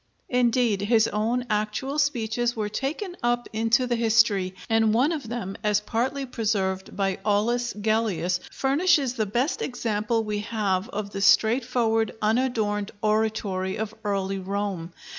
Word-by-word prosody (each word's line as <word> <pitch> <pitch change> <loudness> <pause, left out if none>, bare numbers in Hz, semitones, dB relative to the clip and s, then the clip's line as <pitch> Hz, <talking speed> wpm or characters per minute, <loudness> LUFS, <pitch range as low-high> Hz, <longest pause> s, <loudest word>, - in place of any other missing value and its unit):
Indeed, 240 -4 +2
his 220 +1 +3
own 230 +4 -1
actual 215 +7 -1
speeches 240 -4 0
were 215 -2 -2
taken 305 - -3
up 240 0 0
into 225 +3 +2
the 245 -1 0
history, 220 -5 +2
and 225 -1 +3
one 265 +7 +3
of 290 -9 -4
them, 225 -5 -4
as 210 -1 +3
partly 245 +6 -2
preserved 200 -6 -2
by 195 -2 0
Aulus 235 +4 +1
Gellius, 210 -4 0
furnishes 280 -1 +2
the 220 -4 -1
best 245 +9 0
example 225 -2 -1
we 210 -1 -2
have 205 -3 -1
of 200 0 -4
the 195 - -4
straightforward 225 +2 +3
unadorned 215 -3 0
oratory 210 -3 0
of 220 0 -4
early 195 -1 -1
Rome. 190 -3 -3
220 Hz, 140 wpm, -25 LUFS, 205-240 Hz, -, his